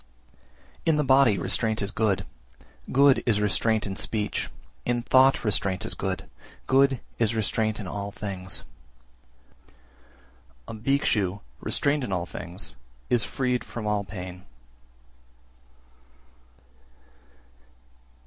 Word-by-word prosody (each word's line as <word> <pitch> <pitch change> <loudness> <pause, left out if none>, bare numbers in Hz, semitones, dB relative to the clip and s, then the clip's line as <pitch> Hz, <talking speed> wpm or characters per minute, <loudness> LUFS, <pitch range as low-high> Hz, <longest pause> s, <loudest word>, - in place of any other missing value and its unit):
361. - - +6
In 150 - +2
the 150 - +2
body 130 -6 +5
restraint 110 +5 +1
is 100 - -2
good, 105 -4 0 0.7
good 140 0 +5
is 105 -3 +3
restraint 110 +1 +2
in 95 -2 -4
speech, 105 +1 -2 0.3
in 120 -1 0
thought 130 +2 +5
restraint 100 -3 +1
is - - -2
good, 95 -2 -3 0.4
good 135 -1 +4 0.2
is 115 -1 +2
restraint 110 0 0
in 105 - -5
all 100 +2 -4
things. 95 -4 -2 2.0
A - - -6
Bhikshu, 110 -5 0 0.2
restrained 140 0 +1
in 125 - -4
all 90 -2 -1
things, 85 -8 -7 0.4
is 120 -3 +3
freed 125 +2 -1
from 115 -2 -6
all 105 -1 0
pain. 90 -2 -8
110 Hz, 110 wpm, -26 LUFS, 100-125 Hz, 2.0 s, 361